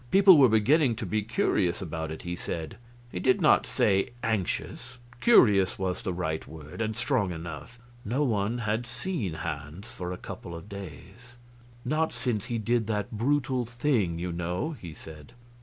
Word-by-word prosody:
People 190 Hz, -2 st, +8 dB
were 130 Hz, -3 st, +7 dB
beginning 115 Hz, +4 st, +4 dB
to 120 Hz, -, -5 dB
be 110 Hz, 0 st, 0 dB
curious 100 Hz, -5 st, +1 dB
about 80 Hz, -3 st, -4 dB
it, 80 Hz, -, -7 dB
he 90 Hz, 0 st, -3 dB
said. 80 Hz, -2 st, -5 dB, 0.3 s
He 90 Hz, -, -4 dB
did 130 Hz, +6 st, +3 dB
not -, -, +4 dB
say 95 Hz, +1 st, +2 dB
anxious 110 Hz, +1 st, -2 dB, 0.2 s
curious 105 Hz, -, +5 dB
was 95 Hz, -2 st, -2 dB
the 95 Hz, -, -2 dB
right 80 Hz, -3 st, -3 dB
word, 80 Hz, +5 st, -9 dB
and 110 Hz, -1 st, -1 dB
strong 120 Hz, -5 st, 0 dB
enough. 80 Hz, -, -7 dB, 0.3 s
No 125 Hz, +8 st, 0 dB
one 110 Hz, -2 st, 0 dB
had 115 Hz, +1 st, -1 dB
seen 120 Hz, -, -3 dB
Hans 80 Hz, +6 st, -6 dB
for 90 Hz, -7 st, -5 dB
a 90 Hz, -, -4 dB
couple 85 Hz, -1 st, -8 dB
of 85 Hz, +4 st, -9 dB
days. 100 Hz, -, -10 dB, 0.5 s
"Not 155 Hz, +5 st, +1 dB
since 120 Hz, -4 st, -2 dB
he 120 Hz, -, -2 dB
did 115 Hz, 0 st, 0 dB
that 105 Hz, -2 st, -2 dB
brutal 130 Hz, +2 st, +1 dB
thing, 120 Hz, -, 0 dB
you 90 Hz, +1 st, -3 dB
know," 90 Hz, -, -2 dB
he 90 Hz, -, -9 dB
said. 75 Hz, -2 st, -12 dB
105 Hz, 170 wpm, -28 LUFS, 90-120 Hz, 0.5 s, People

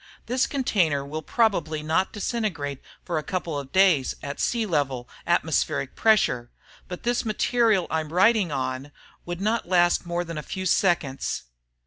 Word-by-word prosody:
The 250 Hz, +2 st, +1 dB
container 175 Hz, -, +1 dB
will 155 Hz, +3 st, -5 dB
probably 165 Hz, -9 st, 0 dB
not 160 Hz, +5 st, +1 dB
disintegrate 190 Hz, -, -3 dB, 0.2 s
for 170 Hz, -3 st, -1 dB
a -, -, -6 dB
couple 170 Hz, -5 st, -3 dB
of 135 Hz, -1 st, -9 dB
days 185 Hz, -8 st, +4 dB
at 140 Hz, 0 st, -5 dB
sea 235 Hz, -2 st, 0 dB
level 135 Hz, -, -1 dB, 0.2 s
atmospheric 160 Hz, -5 st, 0 dB
pressure, 200 Hz, -, +2 dB, 0.4 s
but 180 Hz, -, -7 dB
this 240 Hz, 0 st, +1 dB
material 220 Hz, -3 st, +2 dB
I'm 160 Hz, -1 st, -2 dB
writing 190 Hz, 0 st, +4 dB
on 135 Hz, +1 st, -3 dB, 0.4 s
would 175 Hz, 0 st, -4 dB
not 215 Hz, -2 st, 0 dB
last 175 Hz, -1 st, +3 dB
more 175 Hz, 0 st, -1 dB
than 165 Hz, -2 st, -5 dB
a -, -, -4 dB
few 185 Hz, +4 st, -5 dB
seconds. 165 Hz, -7 st, +1 dB
175 Hz, 150 wpm, -25 LUFS, 145-210 Hz, 0.4 s, days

